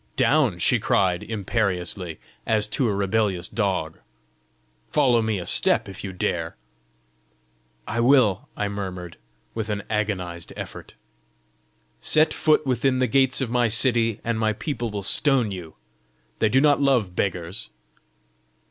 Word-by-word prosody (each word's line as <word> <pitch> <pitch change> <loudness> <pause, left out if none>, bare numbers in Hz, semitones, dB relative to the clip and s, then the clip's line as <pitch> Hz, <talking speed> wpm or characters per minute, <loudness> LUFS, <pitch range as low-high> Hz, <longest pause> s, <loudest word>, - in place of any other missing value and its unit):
"Down!" - - +2
she - - +3
cried 90 -3 +1
imperiously, 95 -5 -2 0.3
as 110 -2 +2
to 120 +1 0
a - - +1
rebellious 100 -2 0
dog. 95 -7 -2 0.9
"Follow 125 -6 +3
me 110 -2 -1
a 90 - -5
step - - +2
if 95 - -8
you 100 - -5
dare!" 85 -2 -2 1.3
"I 120 - -2
will!" 120 -6 +3
I 105 - -1
murmured, 95 -4 -6 0.4
with 110 -1 -4
an 100 -1 -2
agonised 90 -6 -3
effort. - - -8 1.1
"Set 155 +1 +3
foot 155 -1 +2
within 130 0 +1
the 130 - +2
gates 130 +2 +2
of 125 -3 -2
my 120 -1 +2
city, 115 -1 +2
and 115 -1 -1
my 110 -1 +1
people 120 0 -4
will 100 -1 -5
stone 130 0 +2
you: 85 -4 -8 0.6
they 110 - +3
do 130 - +4
not 145 0 +4
love 120 -10 +2
beggars!" 90 -1 -3
105 Hz, 140 wpm, -24 LUFS, 95-120 Hz, 1.3 s, do